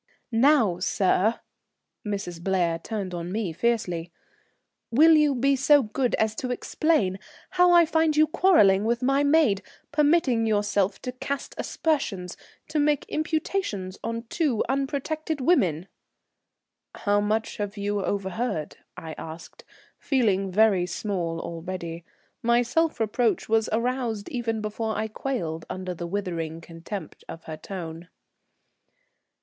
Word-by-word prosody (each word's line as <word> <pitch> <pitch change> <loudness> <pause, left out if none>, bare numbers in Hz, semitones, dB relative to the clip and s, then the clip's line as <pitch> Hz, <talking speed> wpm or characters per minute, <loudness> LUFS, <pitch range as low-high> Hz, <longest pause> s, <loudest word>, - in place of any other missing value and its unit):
"Now, 230 - +4
sir," 195 +3 +1 0.6
Mrs. 195 -5 -4
Blair 175 -3 +1
turned 200 -4 -4
on 175 0 -4
me 200 -5 -2
fiercely, 180 -5 -1 0.8
"will 315 +7 +6
you 300 -3 +4
be 275 +3 +3
so 285 +1 +5
good 240 +3 0
as 220 0 +1
to 255 - -3
explain 245 - 0 0.3
how 360 -1 +5
I 345 -1 +7
find 320 -1 +1
you 310 - +7
quarrelling 290 - +4
with 235 +3 0
my 275 +2 +3
maid, 285 -9 +3 0.3
permitting 290 -6 +3
yourself 205 -2 +1
to 250 - -3
cast 270 +2 -5
aspersions, 215 - -2 0.3
to 305 0 0
make 295 -1 +2
imputations 310 - -2
upon 230 0 -4
two 255 -1 0
unprotected 285 +4 -2
women?" 195 - +2 1.1
"How 205 -1 +1
much 215 +2 -1
have 205 0 -4
you 205 0 -1
overheard?" 190 -4 -2 0.2
I 165 -3 -7
asked, 160 +1 -9 0.4
feeling 200 -8 +1
very 195 -3 +3
small 175 -3 -3
already. 170 0 -6 0.4
My 235 +1 +3
self 325 +4 0
reproach 225 +1 +1
was 225 0 +2
aroused 230 -2 -1
even 230 -3 -2
before 215 +1 -3
I 220 +1 -1
quailed 210 -9 -4
under 185 -1 -4
the 175 0 -6
withering 170 -4 -3
contempt 165 +2 -8
of 165 - -8
her 160 - -6
tone. 165 -1 -7
220 Hz, 130 wpm, -26 LUFS, 185-270 Hz, 1.1 s, I